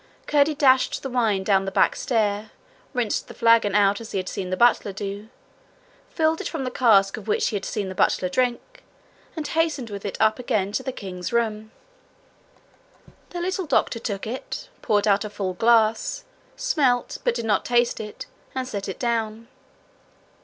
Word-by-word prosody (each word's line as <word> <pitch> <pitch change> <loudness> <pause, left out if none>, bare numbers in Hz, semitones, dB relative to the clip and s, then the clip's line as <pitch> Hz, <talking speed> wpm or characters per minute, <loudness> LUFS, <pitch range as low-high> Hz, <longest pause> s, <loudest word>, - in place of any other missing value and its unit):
Curdie 295 +1 +3
dashed 265 -3 +3
the 270 - -4
wine 220 -6 +1
down 195 -1 +2
the 195 - -3
back - - +3
stair, 215 -4 0 0.4
rinsed 245 -5 -1
the - - -11
flagon 230 -3 +4
out 200 +1 +3
as 225 - -9
he - - 0
had 185 -1 -3
seen 185 -1 -4
the 185 - -2
butler 240 -3 +3
do, 200 +2 -6 0.8
filled 320 -1 +1
it - - -3
from 320 -5 -4
the 255 - -3
cask 205 -6 +4
of 220 - -10
which 210 - +1
he - - -4
had 200 - -3
seen 205 -3 -3
the 190 - -5
butler 185 0 +2
drink, 250 - -2 0.5
and 310 -3 -4
hastened 315 -8 0
with 200 -1 -6
it 200 - -4
up 220 +2 +3
again 205 -5 0
to 235 - -1
the 260 - -4
king's 185 -6 -6
room. 220 -2 -1 1.6
The 350 - -5
little 370 0 -2
doctor 235 - +1
took 200 -3 -4
it, 265 - -6
poured 210 0 +1
out 200 0 +3
a 210 - -5
full 200 -3 -3
glass, 225 +2 +2 0.3
smelt, 290 - +1
but 485 -1 +1
did - - -3
not 210 -2 +2
taste 240 -1 +1
it, 210 -1 -7 0.3
and 260 -1 -2
set 200 -6 -4
it 190 - -5
down. 230 -1 -2
225 Hz, 180 wpm, -24 LUFS, 200-255 Hz, 1.6 s, flagon